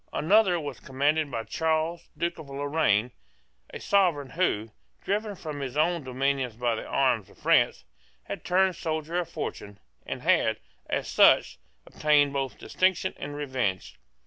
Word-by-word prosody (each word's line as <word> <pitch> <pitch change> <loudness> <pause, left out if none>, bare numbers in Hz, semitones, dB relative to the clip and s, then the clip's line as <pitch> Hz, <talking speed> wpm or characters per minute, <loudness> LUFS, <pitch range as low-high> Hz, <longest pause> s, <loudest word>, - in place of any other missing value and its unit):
Another 185 +1 +3
was 145 -4 -6
commanded 145 +3 0
by 115 -4 -3
Charles, 160 +4 -1
Duke 170 0 -2
of 150 -3 -10
Lorraine, 140 -5 +1 0.6
a - - -7
sovereign 170 -9 +2
who, 115 - 0 0.3
driven 205 +1 -2
from 155 -5 -6
his 135 0 -5
own 165 +1 +1
dominions 130 -2 -1
by 120 0 0
the 110 - -5
arms 120 -7 +1
of - - -19
France, - - +2 0.4
had - - -7
turned 185 0 +2
soldier 160 +1 -2
of 170 -2 -4
fortune, 100 -10 -6 0.3
and - - -5
had, - - +3 0.3
as - - -1
such, 65 - +4 0.3
obtained 145 -2 +2
both 135 -2 -2
distinction 185 0 0
and 145 +1 -6
revenge. 130 - -3
145 Hz, 145 wpm, -27 LUFS, 130-170 Hz, 0.6 s, such